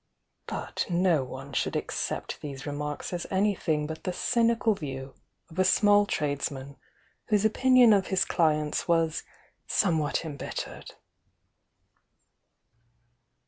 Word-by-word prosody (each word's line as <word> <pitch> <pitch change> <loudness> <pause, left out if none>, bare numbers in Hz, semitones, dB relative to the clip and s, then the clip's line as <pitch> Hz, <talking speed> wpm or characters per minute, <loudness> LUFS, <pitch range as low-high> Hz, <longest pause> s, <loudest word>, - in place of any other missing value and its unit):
But - - -3
no 175 -4 +2
one 135 +2 -9
should - - -1
accept - - -3
these 140 -2 -7
remarks 150 +3 -4
as 175 - -3
any 200 +2 +2
thing 155 -5 -1
but 160 +1 -7
the 185 - -1
cynical 230 +2 +2
view 135 -6 -6 0.4
of 165 - -7
a - - +6
small 205 +2 +4
tradesman 140 -3 -3 0.5
whose 210 -1 +2
opinion 250 +1 +5
of 195 -2 +2
his 190 -1 +1
cUents 155 -3 +1
was 165 -2 +2 0.5
somewhat 160 -5 +1
embit 145 -3 -6
tercel. - - -7
165 Hz, 120 wpm, -28 LUFS, 145-200 Hz, 0.5 s, a